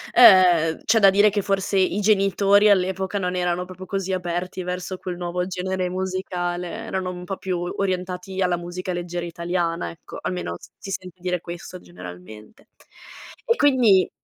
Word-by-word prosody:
uhm, 180 -8 +6
c'è 225 +1 +3
da 195 -1 +7
dire 205 +2 +5
che 205 0 -1
forse 195 0 0
i 190 +2 +2
genitori 200 0 +4
all'epoca 190 0 +1
non 180 -1 -1
erano 180 0 0
proprio 185 +1 -10
così 195 0 -3
aperti 180 0 -3
verso 180 +1 -4
quel 180 -1 -5
nuovo 180 +1 -3
genere 185 0 -2
musicale, 180 -1 -3
erano 190 -3 -4
un 180 0 -8
po' 190 +1 -5
più 185 -2 -3
orientati 185 +1 -3
alla 180 -1 +2
musica 175 +2 -5
leggera 175 0 -4
italiana, 170 0 -2
ecco, 165 - -11
almeno 85 - -3
s - - -15
si 195 - -8
sente 185 -1 -7
dire 180 -1 -1
questo 175 +2 -8
generalmente. 90 - -12 0.8
E 465 - +3
quindi 245 - +4
185 Hz, 160 wpm, -23 LUFS, 175-190 Hz, 0.8 s, da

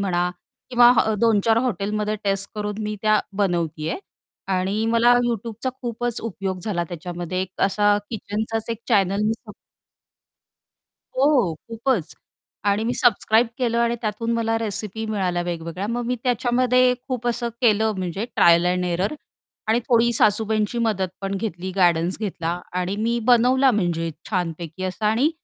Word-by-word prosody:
म्हणा 180 -2 0 0.4
किंवा 240 0 +7 0.3
2-4 225 -1 +3
हॉटेलमध्ये 210 0 -1
टेस्ट 195 0 0
करून 210 0 -3
मी 210 0 -3
त्या 215 -1 +4 0.2
बनवते 165 -4 -1
आहे - - -3 0.6
आणि 200 +4 -1
मला 230 +1 +4
Youtubeचा 230 +2 -3
खूपच 240 0 -3
उपयोग 195 -4 -4
झाला 175 -6 -1
त्याच्यामध्ये 175 +1 -4
एक 185 -1 -9
असा 205 +1 +3
किचनचाच 220 +1 -3
एक 230 - -3
चॅनल 200 -3 +2
मी 220 - +2
सब 210 - -9 1.6
हो, 275 +3 +4
हो 170 -6 -1
खूपच. 230 - -1 0.5
आणि 205 +2 +1
मी 245 - 0
सबस्क्राईब 230 -1 +3
केलं 235 -2 +1
आणि 235 0 +2
त्यातून 230 +1 -2
मला 225 -1 0
रेसिपी 220 0 -3
मिळाल्या 185 -5 -1
वेगवेगळ्या 170 +2 -4
मग 240 +1 -2
मी 250 - 0
त्याच्यामध्ये 250 +1 +3
खूप 245 -2 -3
असं 240 0 -1
केलं 220 -2 +3
म्हणजे 185 +3 -3
ट्रायल 170 +1 +5
अँड 180 0 +1
एरर 180 - -1 0.5
आणि 225 +2 +3
थोडी 235 -1 +4
सासूबाईंची 215 +1 +2
मदत 210 -5 0
पण 195 0 -3
घेतली 190 -3 -4
गाइर्डन्स 175 0 +2
घेतला 175 -4 -3 0.2
आणि 185 +3 -2
मी 230 +2 0
बनवला 255 +2 +5
म्हणजे 170 -6 0 0.2
छानपैकी 170 -2 -3
असा 185 +3 -2
आणि 235 +8 +3
210 Hz, 145 wpm, -23 LUFS, 185-230 Hz, 1.6 s, किंवा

